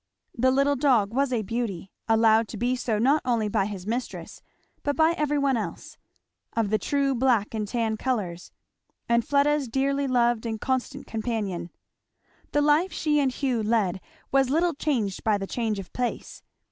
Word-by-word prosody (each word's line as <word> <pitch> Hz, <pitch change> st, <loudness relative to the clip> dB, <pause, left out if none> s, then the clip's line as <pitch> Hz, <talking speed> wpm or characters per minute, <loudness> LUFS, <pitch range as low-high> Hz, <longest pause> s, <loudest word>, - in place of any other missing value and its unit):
The 255 Hz, +2 st, +3 dB
little 275 Hz, +2 st, +3 dB
dog 245 Hz, -7 st, +2 dB
was 275 Hz, +1 st, +1 dB
a 235 Hz, -3 st, 0 dB
beauty, 205 Hz, -4 st, -4 dB, 0.2 s
allowed 225 Hz, 0 st, +4 dB
to 215 Hz, -, -7 dB
be 245 Hz, +4 st, 0 dB
so 235 Hz, -3 st, -1 dB
not 275 Hz, +8 st, +3 dB
only 230 Hz, -4 st, +1 dB
by 195 Hz, -1 st, 0 dB
his 195 Hz, -3 st, -7 dB
mistress 240 Hz, +4 st, -5 dB, 0.4 s
but 285 Hz, 0 st, -1 dB
by 320 Hz, +1 st, +4 dB
every 300 Hz, -3 st, 0 dB
one 275 Hz, -3 st, +2 dB
else; 220 Hz, -, -6 dB, 0.6 s
of 220 Hz, -3 st, 0 dB
the 215 Hz, -, +2 dB
true 275 Hz, +5 st, 0 dB
black 240 Hz, -5 st, +1 dB
and 215 Hz, -2 st, -2 dB
tan 225 Hz, -1 st, -1 dB
colours; 200 Hz, -9 st, -3 dB, 0.6 s
and 235 Hz, 0 st, +3 dB
Fleda's 285 Hz, 0 st, +2 dB
dearly 275 Hz, +3 st, 0 dB
loved 240 Hz, -2 st, +2 dB
and 220 Hz, -1 st, -3 dB
constant 260 Hz, +3 st, -2 dB
companion. 215 Hz, -6 st, -3 dB, 0.8 s
The 290 Hz, -, +2 dB
life 305 Hz, +6 st, +3 dB
she 300 Hz, -2 st, +1 dB
and 270 Hz, -2 st, +2 dB
Hugh 255 Hz, -3 st, -1 dB
led 210 Hz, -4 st, 0 dB, 0.3 s
was 270 Hz, -1 st, +3 dB
little 335 Hz, +4 st, +2 dB
changed 245 Hz, -10 st, -1 dB
by 215 Hz, -2 st, +2 dB
the 195 Hz, -, -4 dB
change 220 Hz, 0 st, -2 dB
of 195 Hz, -3 st, -8 dB
place. 250 Hz, -1 st, -4 dB
240 Hz, 170 wpm, -26 LUFS, 215-275 Hz, 0.8 s, allowed